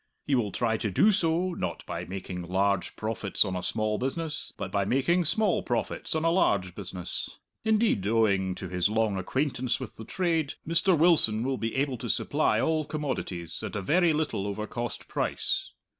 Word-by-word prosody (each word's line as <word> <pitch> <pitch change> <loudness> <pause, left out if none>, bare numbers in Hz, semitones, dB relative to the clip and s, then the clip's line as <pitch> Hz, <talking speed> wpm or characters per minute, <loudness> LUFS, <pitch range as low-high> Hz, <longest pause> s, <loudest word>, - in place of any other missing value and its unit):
He 145 - 0
will 115 -6 +2
try 115 -2 0
to 110 - -2
do 205 - +5
so, 180 -1 +1
not 90 - -4
by 85 0 -4
making 90 -1 -5
large 95 +2 0
profits 110 -2 0
on 95 -2 -2
a 90 - -2
small 110 +2 0
business, 155 +4 -3
but - - -4
by 100 -1 +1
making 140 - +2
small 205 +4 +2
profits 120 +5 -2
on 160 +1 0
a 165 - +4
large 100 - +2
business. 90 -2 -5 0.3
Indeed, 215 - +2
owing 100 -4 +2
to 95 - -6
his 90 +2 +1
long 110 -2 +1
acquaintance 130 +3 -1
with 130 -5 -8
the 110 - -7
trade, 165 - 0
Mr. 170 +2 +3
Wilson 150 -10 +4
will 130 0 -1
be 115 0 -2
able 135 -2 0
to 120 - -5
supply 150 +7 +1
all 160 -1 +1
commodities 115 - -4
at - - -5
a 105 - -1
very 170 - +4
little 150 -10 -1
over 105 +1 -3
cost 120 +2 -5
price. - - -1
115 Hz, 185 wpm, -28 LUFS, 100-160 Hz, 0.3 s, do